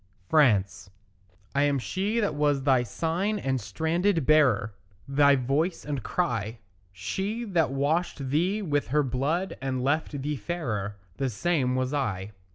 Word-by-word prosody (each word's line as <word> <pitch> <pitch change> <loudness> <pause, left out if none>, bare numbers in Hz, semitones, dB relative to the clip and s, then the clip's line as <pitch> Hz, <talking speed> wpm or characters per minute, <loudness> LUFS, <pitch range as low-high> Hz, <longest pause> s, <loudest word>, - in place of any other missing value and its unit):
FRANCE 105 -11 +3 0.6
I 140 - +2
am 145 -1 +2
she 195 - -1
that 205 -7 0
was 145 -2 +1
thy 130 -3 +4
sign 170 - -1
and 135 -8 -1
standard 165 - 0
bearer, 130 -9 +4 0.3
Thy 140 +1 +5
voice 140 +7 -1
and 145 -3 -3
cry; 115 - -2 0.3
She 195 - -3
that 175 -7 +1
washed 140 0 -1
thee 185 +8 +1
with 145 -5 0
her 150 +4 +2
blood 140 +9 -1
and 130 -2 -2
left 145 0 -1
thee 150 0 -2
fairer, 115 - -3 0.2
The 135 -1 0
same 125 +2 0
was 130 +2 -1
I. 105 -8 -2
145 Hz, 145 wpm, -27 LUFS, 130-165 Hz, 0.6 s, Thy